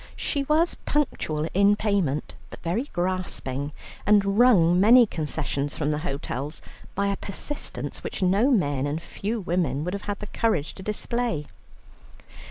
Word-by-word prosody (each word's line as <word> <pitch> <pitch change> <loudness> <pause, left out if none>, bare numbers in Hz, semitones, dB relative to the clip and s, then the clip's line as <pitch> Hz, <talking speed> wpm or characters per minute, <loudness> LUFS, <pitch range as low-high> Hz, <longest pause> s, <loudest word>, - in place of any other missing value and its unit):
She 285 - -1
was 315 +4 +3
punctual 160 - -1
in 200 +2 +5
payment, 195 -10 0 0.2
but - - -10
very 215 - -1
grasping, 175 -6 -2 0.3
and 200 0 +3
wrung 180 -8 +6
many 235 +5 +7
concessions 150 - -3
from 150 -1 0
the 150 - -1
hotels 145 -1 -4 0.4
by 200 - +1
a 200 - 0
persistence 245 +10 -3
which - - -3
no 200 +8 +3
men 145 - +1
and 150 +2 -2
few 210 +6 -4
women 165 -6 0
would 180 +3 -3
have 200 - -5
had 205 - -1
the 210 - -7
courage 205 -8 0
to - - -11
display. 215 -3 -2
185 Hz, 150 wpm, -25 LUFS, 150-210 Hz, 0.4 s, many